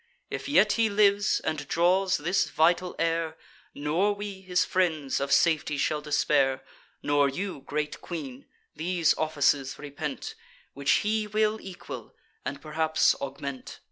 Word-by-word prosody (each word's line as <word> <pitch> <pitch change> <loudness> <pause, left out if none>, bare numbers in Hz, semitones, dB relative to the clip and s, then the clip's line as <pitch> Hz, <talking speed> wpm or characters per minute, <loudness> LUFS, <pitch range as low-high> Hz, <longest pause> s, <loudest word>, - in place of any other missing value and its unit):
If - - -4
yet 215 -7 +5
he 225 -1 +2
lives, 205 0 +3
and 150 -2 -3
draws 185 +4 +2
this 175 +6 0
vital 175 +3 +2
air, 165 -1 -1 0.4
Nor 165 +8 +1
we, 200 -1 -6
his 180 -1 +1
friends, 160 -7 0
of 140 0 -2
safety 155 -2 +3
shall 150 +2 0
despair; 140 -3 +1 0.4
Nor 145 -1 +3
you, 180 +1 -4
great 150 0 -3
queen, 140 -7 -7 0.3
these 170 +1 +1
offices 145 -3 +1
repent, 145 0 -5 0.4
Which 140 +7 +1
he 215 0 0
will 215 +1 +1
equal, 190 -2 -9 0.3
and 140 - -4
perhaps 160 +1 +2
augment. 140 -1 -6
160 Hz, 135 wpm, -27 LUFS, 145-190 Hz, 0.4 s, yet